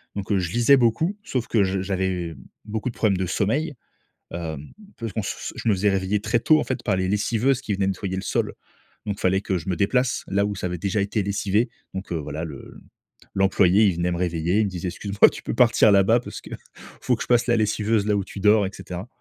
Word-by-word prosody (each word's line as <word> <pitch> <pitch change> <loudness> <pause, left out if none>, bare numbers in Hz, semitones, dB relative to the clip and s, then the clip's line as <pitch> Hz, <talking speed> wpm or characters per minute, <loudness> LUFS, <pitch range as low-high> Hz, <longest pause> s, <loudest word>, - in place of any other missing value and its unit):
Donc, 100 +1 -4
heu, 100 - +3
je 85 -1 -3
lisais 120 +5 +5
beaucoup. 155 - +1
Sauf 125 -3 -3
que 110 -4 +3
je 95 0 -1
j'avais 95 -4 -2 0.3
beaucoup 110 +3 -3
de - - -10
problèmes 100 -4 +2
de 95 - -1
sommeil. 135 - -1 0.6
Hem, 80 -4 -6 0.3
parce 115 -2 -5
qu'on 110 -1 -2
se - - -5
je - - -5
me 105 - +5
faisais 100 +2 +2
réveiller 95 +1 0
très 120 - +1
tôt, 155 +6 +4
en - - 0
fait, 130 - -4
par 100 - +1
les 95 0 -1
lessiveuses 115 +6 +1
qui 110 -6 -3
venaient 95 0 0
nettoyer 95 0 -3
le 95 - -3
sol. - - -1 0.5
Donc 100 -1 -3
fallait 95 +1 +2
que 95 -2 -1
je 80 - -8
me 90 - 0
déplace 125 +8 +1
là, 100 +1 +1
où 105 - -3
ça 90 - -3
avait 90 - -4
déjà 100 +4 -1
été 100 +2 -1
lessivé. 100 +3 0 0.2
Donc 95 -1 -6
heu, 85 - 0
voilà, 75 +2 -5
le 70 -4 -10 0.6
l'employé, 95 +1 +4
il 95 - +1
venait 85 +1 -1
me 85 - -2
réveiller, 85 +2 0
il 110 - +3
me 100 - -2
disait: 90 0 -5
«Excuse-moi, 100 +3 +3
tu - - -9
peux - - -3
partir 115 -3 +5
là-bas 100 +4 +5
parce - - -8
que - - -13 0.5
faut - - +1
que - - -5
je - - -11
passe 120 0 +3
la 120 - +3
lessiveuse 105 0 +1
là 105 - +2
où 100 - -1
tu 100 - -9
dors» 105 +1 +4
et - - -7
cetera. 90 +5 -7
100 Hz, 245 wpm, -23 LUFS, 95-110 Hz, 0.6 s, lisais